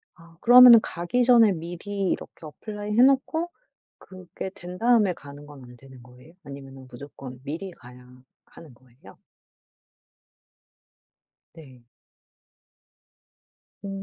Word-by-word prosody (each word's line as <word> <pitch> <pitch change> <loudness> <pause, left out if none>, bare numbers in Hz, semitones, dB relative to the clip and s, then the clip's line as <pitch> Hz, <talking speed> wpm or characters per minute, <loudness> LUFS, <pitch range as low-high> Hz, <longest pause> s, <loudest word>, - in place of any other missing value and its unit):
아 165 -1 -20
그러면은 245 -1 +8
가기 180 +9 -3
전에 235 -4 +5
미리 180 +3 -5
이렇게 - - -7
어플라이 210 +6 -9
해 - - +5
놓고 275 +6 +1 0.8
그게 190 - -7
된 180 -2 -10
다음에 225 -4 +2
가는 145 -2 -14
건 145 -2 -14
안 125 0 -15
되는 130 0 -17
거예요? 125 +6 -19
아니면은 135 -1 -12
무조건 130 0 -12
미리 165 +7 -7
가야 125 -3 -17 0.2
하는 155 -6 -17
거예요? 125 +1 -21 2.3
네. 130 -7 -17 1.9
어. 200 - -8
165 Hz, 230 characters per minute, -24 LUFS, 130-205 Hz, 2.3 s, 그러면은